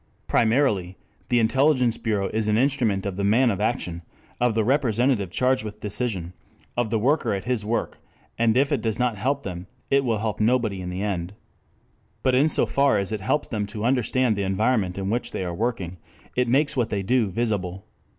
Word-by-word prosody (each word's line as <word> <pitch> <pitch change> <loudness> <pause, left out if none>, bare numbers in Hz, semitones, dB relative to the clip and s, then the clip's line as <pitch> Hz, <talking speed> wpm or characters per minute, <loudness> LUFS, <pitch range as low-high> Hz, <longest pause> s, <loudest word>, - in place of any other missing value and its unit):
Primarily, 110 -7 +1 0.3
the 120 - +3
intelligence 125 +1 +3
bureau 105 -4 0
is 110 -1 0
an 105 0 +2
instrument 120 -7 +1
of 100 -2 -3
the 100 - -1
man 115 +5 +4
of 95 - -3
action, 85 -1 -2 0.4
of 120 -2 +2
the 110 - +2
representative 120 -4 +1
charged 130 +5 +1
with 105 -1 -7
decision, 100 -5 -3 0.4
of 120 -2 0
the 110 - +1
worker 120 -2 +1
at 95 - -4
his 125 -4 -1
work, 115 +3 -2 0.4
and 115 0 +2
if 140 +1 +3
it - - +1
does 110 -2 -1
not 125 -5 0
help 140 +5 0
them, 90 -1 -6 0.2
it 140 0 +4
will 115 -4 0
help 105 -1 -3
nobody 110 -4 +1
in 90 - -5
the 90 +2 -3
end. 95 -2 -3 0.9
But 130 - +3
in 135 +4 +4
so - - +2
far 140 -5 +2
as 100 +1 -2
it 110 -2 -3
helps 150 +9 0
them 105 -3 -2
to 105 +1 -5
understand 125 -1 +2
the 100 - -2
environment 95 0 0
in 95 +1 -2
which 120 +2 -2
they 95 - -2
are 90 - -3
working, 95 -4 -3 0.4
it 125 0 +1
makes 140 +4 +2
what 120 -4 0
they 100 -2 -2
do 115 +1 +2
visible. 95 -3 -2
110 Hz, 200 wpm, -24 LUFS, 100-125 Hz, 0.9 s, man